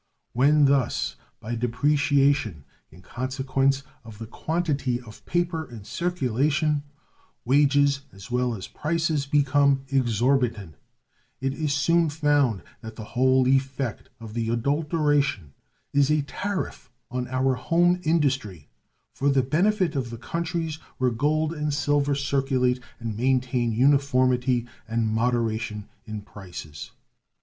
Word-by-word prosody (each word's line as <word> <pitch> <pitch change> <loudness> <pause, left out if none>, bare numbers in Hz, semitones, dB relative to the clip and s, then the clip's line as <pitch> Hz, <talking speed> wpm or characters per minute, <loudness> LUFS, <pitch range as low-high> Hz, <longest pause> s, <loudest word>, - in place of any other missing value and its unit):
When 145 +4 +4
thus, 135 -3 +1 0.2
by 115 +3 -5
depreciation 140 - +1 0.3
in 90 +4 -17
consequence 135 +3 -1 0.2
of 110 -3 -11
the 115 - -7
quantity 140 -1 -1
of 115 -3 -14
paper 175 -2 -1
in 115 -4 -10
circulation, 150 - 0 0.6
wages 140 +1 +3
as 100 +5 -12
well 125 -1 0
as 95 - -7
prices 155 -2 -1
become 140 -1 +3
exorbitant, 120 - +1 0.7
it 135 0 -1
is 150 0 -2
soon 165 +2 +3
found 145 - +1 0.2
that 110 0 -9
the 110 - -7
whole 130 +1 +3
effect 135 -2 0
of 110 -2 -9
the 115 -1 -2
adulteration 145 - 0 0.4
is 140 -1 +3
a 150 -1 +2
tariff 185 -2 -4 0.2
on 125 0 -2
our 130 +1 +1
home 175 +6 +2
industry 135 - 0 0.4
for 140 - 0
the 135 -2 +3
benefit 180 +5 +1
of 130 -4 -2
the 115 - -7
countries 165 +2 -3 0.2
where 130 -1 +1
gold 155 +6 0
and 150 -2 -2
silver 145 -1 +1
circulate 135 -2 +1 0.2
and 115 -2 -4
maintain 125 0 +1
uniformity 130 -1 +2 0.2
and 115 0 0
moderation 110 -2 -1 0.2
in 110 -1 -6
prices. 90 -8 -9
135 Hz, 125 wpm, -25 LUFS, 120-145 Hz, 0.7 s, When